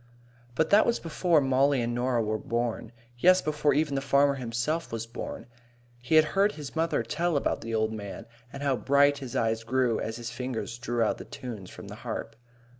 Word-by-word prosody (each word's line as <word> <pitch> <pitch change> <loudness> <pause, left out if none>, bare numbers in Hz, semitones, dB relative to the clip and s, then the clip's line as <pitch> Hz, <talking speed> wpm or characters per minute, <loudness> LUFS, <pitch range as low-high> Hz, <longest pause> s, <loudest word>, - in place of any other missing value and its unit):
But 160 +3 +1
that 205 +2 +6
was 235 - +1
before 165 -1 +2
Mollie 135 -1 +2
and 120 +1 -2
Norah 120 -1 +1
were 110 0 -1
born. 115 -1 -2 0.3
Yes, 185 +6 +6
before 150 -3 +1
even 150 -1 +1
the 135 - 0
farmer 140 +1 +3
himself 130 +6 -2
was 115 0 -3
born. 115 +1 -7 0.5
He 125 +6 0
had 155 0 +7
heard 200 +2 +3
his 150 -1 -8
mother 160 -6 +1
tell 170 +7 0
about - - -1
the 115 0 -3
old 110 0 +1
man, 105 +1 -7 0.3
and 140 - -7
how 135 -3 +1
bright 140 +2 +3
his 130 -3 -7
eyes 115 0 0
grew 125 -1 +1
as 110 - -3
his 120 -1 -6
fingers 120 -1 -4
drew 120 0 0
out 110 - 0
the - - -8
tunes 110 -7 -8
from - - -11
the - - -8
harp. - - -5
130 Hz, 200 wpm, -28 LUFS, 115-150 Hz, 0.5 s, had